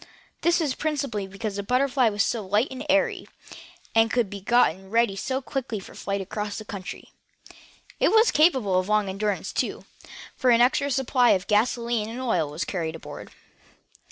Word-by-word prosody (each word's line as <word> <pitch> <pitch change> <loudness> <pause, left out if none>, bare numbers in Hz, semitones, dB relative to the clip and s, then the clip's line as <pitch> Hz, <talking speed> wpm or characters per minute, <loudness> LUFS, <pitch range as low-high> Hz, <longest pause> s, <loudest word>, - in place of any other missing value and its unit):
This 345 +1 +3
was 300 -5 0
principally 275 -11 -2
because 200 +1 -5
the - - -1
BUTTERFLY 255 +2 +2
was 205 -1 +1
so 225 -3 -2
light 205 +6 +1
and 260 +1 -6
airy, 290 0 +1 0.7
and 225 0 +4
could 230 -3 0
be 200 -1 -7
gotten 195 -4 +2
ready 230 -2 +2
so 260 +7 -3
quickly 255 -5 -4
for 190 - -12
a - - -15
flight 200 0 -3
across 210 +2 -4
country. 200 -3 -8 0.9
It - - +4
was 445 +1 +5
capable 260 - +3
of 185 +2 -4
long 210 -1 +2
endurance, 200 +1 -2
too, - - -2 0.5
for 255 - +1
an 235 -1 +5
extra 250 +3 +3
large 280 - -1
supply 255 -2 +3
of 185 -1 -1
gasolene 230 +1 +1
and 235 +3 -6
oil 180 - 0
was 150 +5 -4
carried 165 -4 -3
aboard. 165 - -9
225 Hz, 180 wpm, -25 LUFS, 200-255 Hz, 0.9 s, was